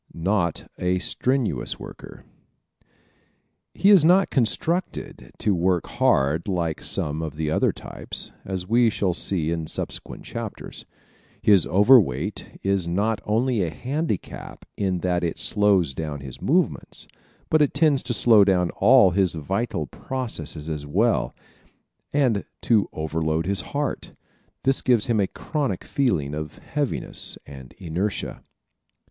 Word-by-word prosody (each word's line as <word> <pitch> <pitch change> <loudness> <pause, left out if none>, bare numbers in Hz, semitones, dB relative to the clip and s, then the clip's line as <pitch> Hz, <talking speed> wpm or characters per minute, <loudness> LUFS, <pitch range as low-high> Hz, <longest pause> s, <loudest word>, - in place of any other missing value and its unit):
Not 85 -1 -1
a 90 0 +1
Strenuous 120 - 0
Worker - - -11 0.6
¶ - - -47 0.9
He 200 - +4
is 190 -6 +7
not 185 +4 +4
constructed 160 +8 0
to 105 - +1
work 90 0 +1
hard 70 +6 +1
like 85 -5 -1
some 75 +2 -3
of 80 -2 -5
the 75 0 -2
other - - +2
types, - - -6
as 95 -2 -5
we 115 +2 +4
shall 95 -4 0
see 85 -2 -1
in 80 -2 -3
subsequent - - -5
chapters. - - -7 0.6
His 100 -5 +5
overweight 100 - +3
is 95 -3 +1
not 105 +5 0
only 115 +1 +1
a 85 - 0
handicap 130 - -4
in 95 -3 -1
that 90 -1 0
it 85 - -2
slows 100 -8 +2
down 75 -1 -5
his 65 -2 -9
movements, - - -1 0.4
but 155 - +4
it 145 - +2
tends 145 -3 +3
to 120 - -3
slow 110 -4 +6
down 90 -3 +2
all 115 -2 +5
his 95 -1 +1
vital 90 +2 -2
processes 80 - -6
as 75 -2 -4
well 105 +11 +1 0.8
and 125 -8 +2 0.2
to 110 -4 +3
overload 80 +1 -1
his 95 -1 0
heart. 145 0 -4 0.5
This 135 0 +2
gives 120 -4 +3
him 115 -3 +1
a 100 - +2
chronic 140 - -3
feeling 90 - 0
of 75 0 -5
heaviness 145 -3 -3
and 65 -3 -11
inertia. 95 +4 -3
95 Hz, 135 wpm, -24 LUFS, 80-120 Hz, 0.9 s, is